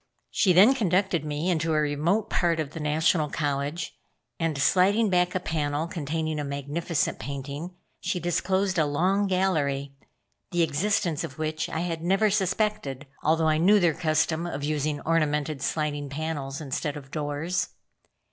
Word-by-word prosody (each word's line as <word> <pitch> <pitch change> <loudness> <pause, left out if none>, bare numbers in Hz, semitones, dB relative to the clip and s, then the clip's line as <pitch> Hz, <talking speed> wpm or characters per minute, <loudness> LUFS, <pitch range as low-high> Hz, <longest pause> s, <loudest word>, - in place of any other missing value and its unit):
She 190 - +3
then 195 +9 +7
conducted 190 - +1
me 150 +2 -2
into 165 -3 +1
a - - +3
remote 155 +9 +1
part 170 -5 +1
of 150 -2 -2
the 165 - -7
National 155 +1 +2
College, 145 +2 -2 0.4
and 165 -3 0
sliding 195 +8 +3
back 180 0 +2
a - - +2
panel 150 -3 -1
containing 160 -1 -3
a - - -1
magnificent 145 +4 -2
painting, 140 +7 -6 0.2
she 180 - -2
disclosed 185 +2 0
a 155 - +3
long 185 +7 +1
gallery, 150 -8 0 0.6
the 175 -1 +2
existence 165 +1 0
of 130 - -7
which 155 0 -2
I 160 - -2
had 170 -2 -3
never 195 +5 +2
suspected, 195 - -1 0.2
although 160 +1 +2
I 155 0 +3
knew 205 +5 +5
their 175 -4 +3
custom 160 +2 0
of 145 -4 -4
using 150 0 -1
ornamented 150 -3 0
sliding 145 -2 -2
panels 145 -2 -4
instead 150 0 -3
of 135 -1 -11
doors. 150 +4 -2
160 Hz, 155 wpm, -26 LUFS, 145-180 Hz, 0.6 s, then